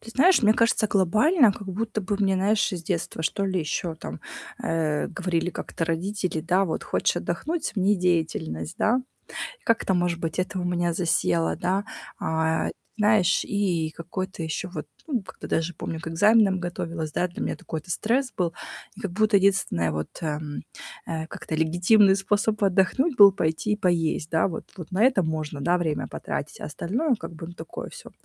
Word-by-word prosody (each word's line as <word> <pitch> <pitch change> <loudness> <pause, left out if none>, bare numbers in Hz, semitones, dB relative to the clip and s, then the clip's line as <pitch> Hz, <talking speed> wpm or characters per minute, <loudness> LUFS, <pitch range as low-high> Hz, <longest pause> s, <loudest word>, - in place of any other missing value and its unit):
Ты 230 - -11
знаешь, 305 +4 +5
мне 215 - +6
кажется, 230 -1 +3
глобально 215 - +4
как 200 -1 -9
будто 215 +3 -2
бы 200 +2 -1
мне, 195 -1 +3
знаешь, 205 +3 +2
с 175 -2 -4
детства, 160 0 -3
что 200 +4 0
ли, 185 -2 0
ещё 160 +2 -2
там, 80 - -8 0.4
э, 155 -2 0
говорили 180 -2 -1
как-то 165 - -4
родители, 180 +1 -2
да, 180 +4 +2
вот: 165 - -3
"Хочешь - - +1
отдохнуть- 330 +1 -2
смени 200 0 +2
деятельность". 160 - -1
Да? 245 +4 +2 0.6
Как-то, 230 -4 +2
может 175 -2 +1
быть, 165 +1 -3
это 185 +1 -1
у - - -2
меня 175 -1 0
засело, 90 - +1
да. 190 +3 0 0.4
А, 160 0 0
ат - - -3 0.3
знаешь, 210 -3 +3
и 185 -6 0
и - - -8
какой-то 180 +2 -5
ещё 160 +3 -3
вот, - - -6 0.2
м, 275 - -1
ну 235 - +1
как-то 185 - -10
даже, 165 +2 0
помню, 160 - -5
к 165 - -8
экзаменам 205 +2 +4
готовилась, 165 -3 -4
да. 180 - 0
Для 175 - -6
меня - - -2
такой-то 160 +2 -6
стресс 240 - 0
был, 170 -3 0 0.4
и - - -11
как 200 - -3
будто 215 +2 +2
единственное, 190 - +2
вот, 75 0 -3
ам, 150 -2 -3 0.4
а, 160 -1 -4
как-то 160 - -5
легитимный 180 +6 +4
способ 205 +2 0
отдохнуть 200 - +2
был 200 -1 +10
пойти 160 +3 -1
и - - -2
поесть, 165 -5 0
да. 160 +3 +3
Вот 170 - -6
вот 175 0 -8
на 195 +5 +2
это 250 -8 +4
можно, 155 -2 -3
да, 175 +6 +2
время 160 -4 -1
потратить, - - -5
а, - - -3
остальное, 240 - 0
как 190 - -8
бы, 165 +1 -8
ну 175 - -9
такое 160 -1 -7
всё - - -11
180 Hz, 185 wpm, -25 LUFS, 160-205 Hz, 0.6 s, был